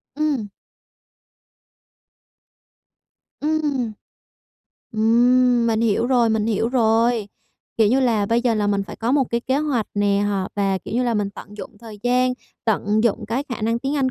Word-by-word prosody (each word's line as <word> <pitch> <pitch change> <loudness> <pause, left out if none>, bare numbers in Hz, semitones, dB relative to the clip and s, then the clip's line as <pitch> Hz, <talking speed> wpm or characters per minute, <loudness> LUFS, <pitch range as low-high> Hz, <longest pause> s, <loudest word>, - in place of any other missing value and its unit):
Ừm. 285 -8 -1 2.9
Ừm. 295 -6 -1 1.0
Ừm, 240 +2 +3
mình 225 -1 +1
hiểu 230 0 +1
rồi, 245 -2 +3
mình 220 -1 0
hiểu 225 0 0
rồi. 230 -2 +2 0.5
Kiểu 220 -2 +4
như 260 +5 +3
là, 225 -5 +1
bây 230 +3 +2
giờ 240 -2 +2
là 210 -1 0
mình 200 -1 +1
phải - - -9
có 235 +3 -1
một 280 -2 +3
cái 235 - 0
kế 260 +3 0
hoạch 280 -8 -1
nè 205 -1 +2
họ 195 -2 -2
và 195 -1 +1
kiểu 185 - -8
như 250 - +1
là, 240 -2 0
mình 205 -2 -1
tận 205 +1 -12
dụng 210 +1 -10
thời 220 -2 -11
gian, 250 +1 +2 0.3
tận 215 -1 +1
dụng 225 -1 0
cái 235 +5 -1
khả 240 -4 -5
năng 230 +1 +1
tiếng 275 +4 -2
Anh 265 -2 +1
230 Hz, 170 wpm, -21 LUFS, 210-250 Hz, 2.9 s, Kiểu